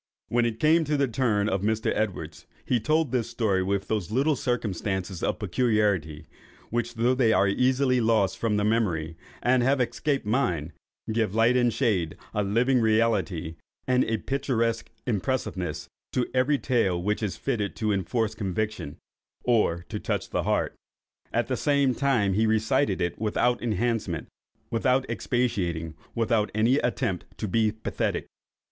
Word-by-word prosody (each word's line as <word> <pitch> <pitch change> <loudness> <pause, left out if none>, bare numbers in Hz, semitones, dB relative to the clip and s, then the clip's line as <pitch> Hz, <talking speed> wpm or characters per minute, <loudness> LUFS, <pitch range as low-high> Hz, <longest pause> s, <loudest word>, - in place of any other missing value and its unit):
When 120 0 +2
it 115 -1 -4
came 160 +2 +4
to 150 0 0
the 140 -1 +2
turn 110 -4 +1
of 95 -3 0
Mr. 110 +2 0
Edwards, 85 -6 -3 0.2
he 125 - +2
told 155 +3 +1
this 120 -3 0
story 110 -5 +1
with 100 +1 -1
those 105 -5 -1
little 140 +7 +2
circumstances 95 -7 -2
of - - 0
particularity, 100 -7 0 0.5
which, 120 +1 -2
though 120 +3 +2
they 125 -3 +3
are 100 - +4
easily 125 +4 +2
lost 110 -4 +2
from 110 -3 +1
the 105 - +1
memory, 90 -8 0 0.3
and 125 +1 +4
have 135 +3 +2
escaped 125 +3 -1
mine, 90 - 0 0.4
give 110 -2 0
light 115 +2 +4
and 120 -1 +3
shade, 100 - 0 0.2
a 105 - +1
living 120 +6 +2
reality, 105 -7 +1 0.3
and 125 0 +3
a 115 - 0
picturesque 115 -3 -1 0.2
impressiveness, 95 - -2 0.3
to 125 - +1
every 130 +3 +3
tale 115 -10 +1
which 105 +5 -1
is 105 -4 -2
fitted 110 -7 -2
to 110 -1 0
enforce 105 +3 0
conviction, 100 -5 -3 0.5
or 95 -8 +2
to - - -4
touch - - -3
the - - 0
heart. - - 0 0.6
At - - +1
the - - -1
same 140 -3 +2
time 120 -7 +1
he 110 +3 +2
recited 110 0 +1
it 85 -1 -2
without 120 +3 +1
enhancement, 110 -6 -1 0.4
without 125 +3 +2
expatiating, 90 -10 -1 0.2
without 115 -2 +1
any 115 +5 +3
attempt 120 -8 -1
to 110 - -3
be 110 +2 +2
pathetic. 110 +1 -2
110 Hz, 155 wpm, -26 LUFS, 100-125 Hz, 0.6 s, came